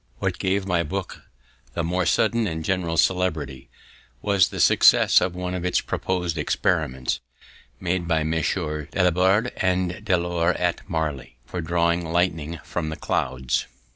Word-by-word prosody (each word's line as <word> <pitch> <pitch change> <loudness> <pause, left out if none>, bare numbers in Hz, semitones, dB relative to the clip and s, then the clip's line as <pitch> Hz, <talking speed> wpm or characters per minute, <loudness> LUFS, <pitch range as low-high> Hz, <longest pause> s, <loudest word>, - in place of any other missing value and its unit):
What - - -2
gave 95 +1 0
my 90 -3 +1
book 90 +3 -5 0.5
the 85 - -1
more 90 +1 0
sudden 110 +5 +2
and 80 -2 -4
general 90 -4 -1
celebrity, 80 -8 0 0.5
was 100 -3 +3
the - - -6
success - - +6
of 90 -1 -1
one 90 0 -3
of 90 -1 -3
its 90 - +2
proposed 90 -3 -2
experiments, 65 0 0 0.6
made 90 -1 -1
by 80 -2 +1
Messrs. 80 -1 -1
Dalibard 95 +5 +3
and 90 +1 0
De 95 -4 +2
Lor 85 0 0
at - - -1
Marly, 75 -6 -3
for 90 +7 -5
drawing 85 +1 +1
lightning 85 -2 0
from 80 -3 -3
the 80 - -4
clouds. 65 -3 -1
85 Hz, 145 wpm, -24 LUFS, 80-90 Hz, 0.6 s, success